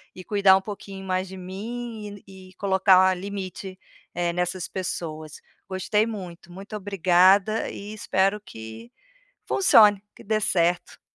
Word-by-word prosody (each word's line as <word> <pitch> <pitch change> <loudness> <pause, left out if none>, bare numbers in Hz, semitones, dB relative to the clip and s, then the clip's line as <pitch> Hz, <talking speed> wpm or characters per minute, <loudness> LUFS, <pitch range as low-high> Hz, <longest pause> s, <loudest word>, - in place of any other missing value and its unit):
e 185 - -9
cuidar 200 -1 +4
um - - -3
pouquinho 195 -1 -8
mais 185 0 -1
de 190 +1 -9
mim, 210 +2 -7
e 190 -1 -14
e - - -21
colocar 190 -1 +4
limite, 190 0 -7 0.4
eh, 175 0 0
nessas 180 0 -2
pessoas. 155 -4 -5 0.4
Gostei 190 +3 +1
muito, 180 -6 -8
muito 195 +4 -9
obrigada 195 +2 +3
e 205 +1 -8
espero 195 -1 0
que 110 - -10 0.6
funcione, 210 - +5
que - - -14
dê 215 +1 0
certo. 175 -3 0
190 Hz, 135 wpm, -24 LUFS, 180-205 Hz, 0.6 s, funcione